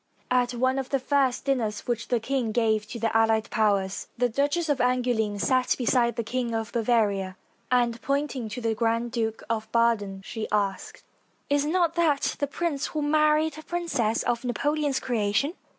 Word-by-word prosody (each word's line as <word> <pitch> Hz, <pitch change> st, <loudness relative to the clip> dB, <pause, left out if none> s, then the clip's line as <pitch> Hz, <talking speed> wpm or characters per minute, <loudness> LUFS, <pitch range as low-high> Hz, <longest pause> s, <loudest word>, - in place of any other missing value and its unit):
At 245 Hz, -1 st, +2 dB
one 260 Hz, +2 st, +1 dB
of 265 Hz, -, -5 dB
the 275 Hz, -, +2 dB
first 265 Hz, -1 st, +1 dB
dinners 230 Hz, -7 st, 0 dB
which 235 Hz, -2 st, -3 dB
the 245 Hz, -, +1 dB
king 245 Hz, -1 st, -1 dB
gave 220 Hz, -2 st, +1 dB
to 235 Hz, -, -6 dB
the 225 Hz, 0 st, -1 dB
allied 225 Hz, -1 st, +2 dB
powers, 200 Hz, -3 st, +1 dB
the 245 Hz, 0 st, +2 dB
Duchess 290 Hz, +7 st, 0 dB
of 290 Hz, -3 st, +1 dB
Angouleme 245 Hz, -4 st, +1 dB
sat 255 Hz, +4 st, +2 dB
beside 240 Hz, -1 st, +2 dB
the 235 Hz, -, -2 dB
King 235 Hz, 0 st, -2 dB
of 225 Hz, -1 st, -3 dB
Bavaria, 210 Hz, -5 st, +1 dB, 0.3 s
and, 240 Hz, -2 st, +1 dB
pointing 275 Hz, -4 st, -2 dB
to 230 Hz, +4 st, -6 dB
the 225 Hz, -1 st, 0 dB
Grand 230 Hz, +1 st, 0 dB
Duke 225 Hz, -2 st, -2 dB
of 220 Hz, -1 st, -3 dB
Baden, 210 Hz, -5 st, +1 dB
she 220 Hz, -2 st, -4 dB
asked: 200 Hz, -2 st, -2 dB, 0.5 s
''Is 285 Hz, 0 st, +2 dB
not 340 Hz, 0 st, +2 dB
that 320 Hz, -5 st, +1 dB
the 285 Hz, -, 0 dB
prince 290 Hz, -1 st, -2 dB
who 305 Hz, -1 st, -3 dB
married 305 Hz, +1 st, +2 dB
a -, -, -11 dB
princess 305 Hz, -12 st, -1 dB
of 240 Hz, 0 st, -1 dB
Napoleon's 290 Hz, +3 st, 0 dB
creation? 230 Hz, +5 st, 0 dB
240 Hz, 175 wpm, -26 LUFS, 220-275 Hz, 0.5 s, At